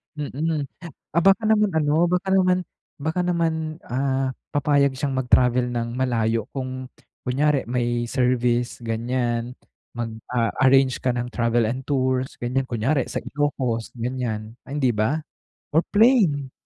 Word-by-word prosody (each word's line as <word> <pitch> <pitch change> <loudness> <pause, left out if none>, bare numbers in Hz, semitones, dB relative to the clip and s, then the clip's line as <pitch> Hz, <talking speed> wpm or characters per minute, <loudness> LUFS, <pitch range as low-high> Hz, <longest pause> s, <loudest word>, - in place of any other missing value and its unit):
Mm. 150 +1 -2 0.5
Ah, 170 - +4
baka 195 +3 +5
naman 210 -2 +3
ano, 150 -2 +2 0.2
baka 180 +2 0
naman 185 -1 +4 0.5
baka 160 +3 -1
naman, 170 -2 +1 0.3
ah, 130 +1 -1 0.2
papayag 140 -2 +3
siyang 140 0 -2
mag 130 -1 -2
travel 125 0 +4
ng 115 -1 -2
malayo 115 -3 0
kung 130 -1 -4 0.4
kunyari 140 0 +1
may 120 -1 -1
service, 125 -1 +1
ganyan. 120 +1 -2 0.4
Mag, 115 -2 -5 0.2
ah, 115 -3 0
arrange 135 -1 +4
ka 125 - +2
ng 120 0 -2
travel 115 -2 +1
and 130 +3 -3
tours, 130 -1 -1
ganyan. 125 +2 0
Kunyari 130 +3 0
sa - - -2
Ilocos, 130 -4 -2
ganyan, 115 -3 -3
hindi 135 -5 0
ba? 110 +9 +1 0.5
Or 160 - +5
plane. 205 - +4
130 Hz, 135 wpm, -23 LUFS, 120-145 Hz, 0.5 s, baka